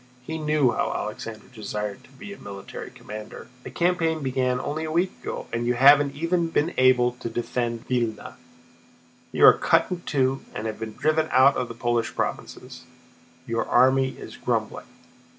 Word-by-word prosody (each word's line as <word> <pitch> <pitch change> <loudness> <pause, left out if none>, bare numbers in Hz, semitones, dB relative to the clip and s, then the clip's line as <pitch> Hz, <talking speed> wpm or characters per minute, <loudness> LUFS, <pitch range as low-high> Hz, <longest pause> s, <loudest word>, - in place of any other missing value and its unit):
He 160 +4 -5
knew 150 -4 +2
how - - -1
Alexander 110 -1 -6
desired 105 -2 -5
to - - -21
be 200 +9 -9
a - - -13
military 100 -1 -8
commander. 105 0 -10
"The - - -9
campaign 165 -3 0
began 130 -1 0
only 155 +4 -3
a 155 - -4
week 175 +3 +1
ago, - - -5
and 120 +1 -1
you 125 - +1
haven't 140 +2 +6
even 170 +2 0
been 165 +1 0
able 130 -1 +4
to 115 - -4
defend 120 0 -3
Vílna. 120 -3 -2 1.0
You - - +5
are - - +10
cut - - +2
in 180 -1 -3
two 135 -4 0
and 105 - -4
have 110 -1 -4
been 110 -1 -6
driven 155 0 +1
out 135 +2 +6
of 125 - -2
the 115 - -9
Polish 120 -1 -1
provinces. - - -5 0.6
Your 115 0 -1
army 130 +1 +3
is - - -10
grumbling." - - -2
130 Hz, 170 wpm, -25 LUFS, 115-155 Hz, 1.0 s, are